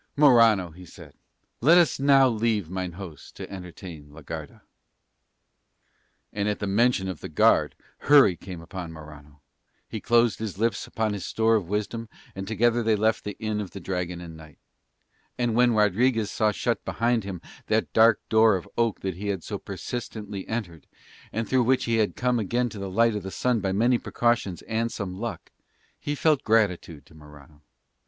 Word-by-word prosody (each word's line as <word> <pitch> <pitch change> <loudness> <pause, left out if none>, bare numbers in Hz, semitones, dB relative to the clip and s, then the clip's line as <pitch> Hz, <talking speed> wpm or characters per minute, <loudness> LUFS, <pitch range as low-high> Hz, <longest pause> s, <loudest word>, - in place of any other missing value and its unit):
"Morano," 115 - +5
he 90 +3 -13
said, 90 - -14 0.5
"let 160 +8 +6
us 170 -7 +3
now 135 -1 +5
leave 110 -6 -1
mine 95 -2 -4
host 90 -5 -10
to - - -7
entertain 90 -5 -9
la 75 +2 -13
Garda." - - -8 1.7
And 105 0 -1
at 105 - -1
the - - -4
mention 100 0 +2
of 95 -4 -5
the - - -7
guard 75 - +3 0.2
hurry 140 -10 +6
came 85 -1 -9
on 90 -4 -6
Morano, 75 -2 -13 0.5
he - - -6
closed 120 -1 +3
his 110 -4 -5
lips 115 0 -1
upon 110 -2 -1
his 100 -3 -5
store 115 0 +1
of 95 -6 -1
wisdom, 105 +2 -3 0.2
and 95 0 -6
together 120 +2 +2
they 110 -1 +2
left 110 +1 +1
the 105 - -6
Inn 110 -1 -2
of 100 - -6
the 100 - -9
Dragon 90 -1 -4
and 85 -2 -9
Knight. 80 -2 -14 0.8
And 120 -2 0
when 120 0 +3
Rodriguez 110 +2 +2
saw 110 -1 +1
shut 120 +3 -2
behind 120 -1 0
him 95 -2 -6 0.3
that 110 +1 0
dark 115 -1 +4
door 110 -1 +5
of 90 - -5
oak 115 -3 0
that 95 -3 -4
he 100 +2 -5
had 95 -4 -2
so - - -5
persistently 105 -5 -6
entered, 90 - -5 0.4
and 110 +1 -3
through 130 -1 +2
which 130 +2 +2
he 115 -1 +1
had 110 -2 +1
come 125 -1 0
again 120 +4 0
to 105 - -9
the 100 -1 -5
light 115 +4 +3
of 105 - -3
the 95 - -6
sun 125 +4 0
by 95 -2 -1
many 120 +5 +2
precautions 120 -7 -1
and 115 +1 -2
some 95 -3 -5
luck, - - -6 0.5
he 145 - -3
felt 150 -1 +2
gratitude 90 -9 0
to - - -20
Morano. 75 -1 -16
105 Hz, 185 wpm, -25 LUFS, 90-115 Hz, 1.7 s, let